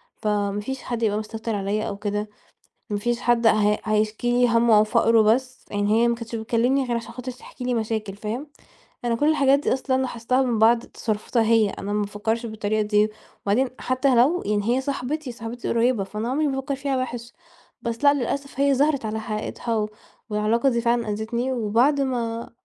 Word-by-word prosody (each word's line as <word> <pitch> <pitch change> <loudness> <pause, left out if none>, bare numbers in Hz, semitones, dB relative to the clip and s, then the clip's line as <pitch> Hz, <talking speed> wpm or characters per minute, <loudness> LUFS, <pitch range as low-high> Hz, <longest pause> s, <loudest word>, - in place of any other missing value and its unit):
فما 205 -1 -1
فيش 265 +5 -5
حد 235 -1 -3
يبقى 210 -2 +2
مستكتر 220 +1 -4
عليَّ 205 +2 -1
أو 200 - -4
كده، 210 +1 -3 0.6
ما 205 - 0
فيش 240 +2 -1
حد 240 -1 +2
ه - - +7 0.3
هيشكي 215 +2 0
لي 245 0 +4
هَمّه 230 -2 +5
أو 210 - +5
فقرُه 230 0 +4
بس، 255 +4 +1
يعني 205 0 0
هي 235 - +4
ما 235 - +2
كنتش 230 0 -8
بتكلمني 240 +4 +1
غير 245 - -3
علشان 235 0 -4
خاطر 255 +1 -6
تحكي 250 0 -11
لي 245 0 0
مشاكل 220 -3 -2
فاهم؟ 220 +7 -4 0.6
أنا 235 -1 +1
كل 290 +6 +2
الحاجات 280 -3 +4
دي 290 - 0
أصلًا 260 0 0
لاحظتها 255 +1 0
من 240 -4 0
بعد 230 +2 +5
تصرفاتها 225 +1 -2
هي. 220 -2 +3
أنا 200 +1 -5
ما 210 - +1
بافكرش 220 +3 -2
بالطريقة 215 -1 -1
دي 210 0 +2 0.4
وبعدين 240 +7 +2
حتى 255 +1 +1
لو 275 +10 +4
يعني 205 0 0
هي 245 +4 +2
صاحبتي 275 0 -3
صاحبتي 235 +1 -6
القريبة، 235 -2 +2
فأنا 210 +4 -4
عمري 295 +4 +1
ما 270 -2 -1
افكر 275 +1 -2
فيها 275 0 -1
وحش، 240 -1 -6 0.5
بس 230 +3 -4
لأ 285 0 +7
للأسف 275 +1 -3
هي 280 -1 +4
ظهرت 280 -3 +1
على 220 +1 -3
حقيقتها 215 0 -2 0.4
والعلاقة 215 +5 +2
دي 235 -3 +1
فعلًا 235 -1 +1
آذتني. 235 +5 -2
وبعد 245 +5 +2
ما 235 -3 -2
235 Hz, 190 wpm, -24 LUFS, 215-255 Hz, 0.6 s, ه